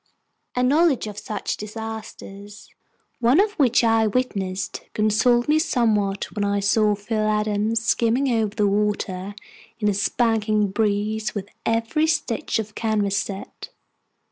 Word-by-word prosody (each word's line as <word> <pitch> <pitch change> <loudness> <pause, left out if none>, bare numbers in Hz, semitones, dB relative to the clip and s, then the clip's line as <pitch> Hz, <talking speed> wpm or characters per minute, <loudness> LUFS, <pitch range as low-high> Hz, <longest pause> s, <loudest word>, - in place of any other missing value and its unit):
A 250 - +1
knowledge 290 0 +3
of 210 -1 -6
such 210 0 -4
disasters, 210 -2 -8 0.5
one 245 +6 +4
of 410 +1 +3
which 245 -4 +4
I 225 -1 +3
witnessed, 200 -5 -2
consoled 225 +3 +2
me 305 +1 +3
somewhat 215 - 0
when 205 - -1
I 200 0 +1
saw 210 +1 +2
Phil 215 +1 -2
Adams 215 +1 0
skimming 240 +4 +2
over 220 -4 0
the 210 -2 +2
water 200 -1 -1 0.4
in 215 -2 -1
a 205 - +3
spanking 215 0 +1
breeze 215 +1 -1
with 200 0 -5 0.2
every 230 +8 +1
stitch 285 -8 -1
of 215 -1 -4
canvas 210 -3 0
set. 195 -1 -7
215 Hz, 135 wpm, -23 LUFS, 205-230 Hz, 0.5 s, one